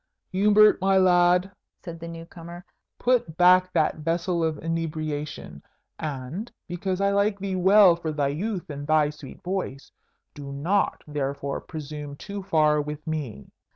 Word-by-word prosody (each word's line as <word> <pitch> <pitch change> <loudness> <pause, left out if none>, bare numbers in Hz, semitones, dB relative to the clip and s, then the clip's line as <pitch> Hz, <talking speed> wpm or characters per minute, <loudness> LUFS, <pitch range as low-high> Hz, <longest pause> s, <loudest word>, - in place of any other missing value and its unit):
"Hubert, 210 +2 +5
my 195 0 +3
lad," 180 0 +4 0.3
said 170 -2 -7
the 170 - -7
new 165 0 -8
comer, 170 +1 -11 0.3
"put 240 -11 +1
back 185 +1 +5
that 155 - +1
vessel 170 +2 -1
of 160 -2 0
inebriation; 155 - -4 0.4
and, 150 - -5 0.2
because 185 +1 -3
I 200 0 +2
like 200 +1 +1
thee 195 -1 -3
well 190 0 +6
for 165 -2 -4
thy 145 -2 0
youth 180 +3 -4
and 145 0 -7
thy 155 -1 +3
sweet 150 -3 -12
voice, 180 -7 -4 0.4
do 140 -1 -8
not 170 +9 0
therefore 140 -1 -3
presume 150 -2 -7
too 200 +6 -7
far 155 -5 +2
with 150 +1 -7
me." 145 - -5
165 Hz, 150 wpm, -25 LUFS, 150-185 Hz, 0.4 s, well